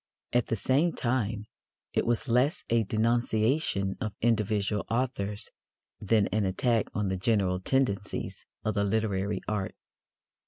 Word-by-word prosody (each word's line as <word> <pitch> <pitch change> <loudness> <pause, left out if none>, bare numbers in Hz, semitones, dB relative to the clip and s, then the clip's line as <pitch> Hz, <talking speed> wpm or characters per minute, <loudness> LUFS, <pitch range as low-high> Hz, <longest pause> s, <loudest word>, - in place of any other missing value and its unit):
At 120 -1 +2
the - - 0
same 140 - +2
time, 115 -4 -1 0.5
it - - +1
was 120 +2 +1
less 125 +6 +2
a 115 -1 +4
denunciation 110 -1 +1
of 105 -2 -3
individual 105 -2 +1
authors 115 -4 -2 0.5
than 105 0 +3
an 105 0 +1
attack 110 +4 +1
on 105 -2 0
the 95 - -1
general 95 -2 +1
tendencies 105 -2 -1 0.2
of 110 - +1
the 100 - +1
literary 100 -2 0
art. 105 -3 -2
110 Hz, 130 wpm, -29 LUFS, 100-120 Hz, 0.5 s, a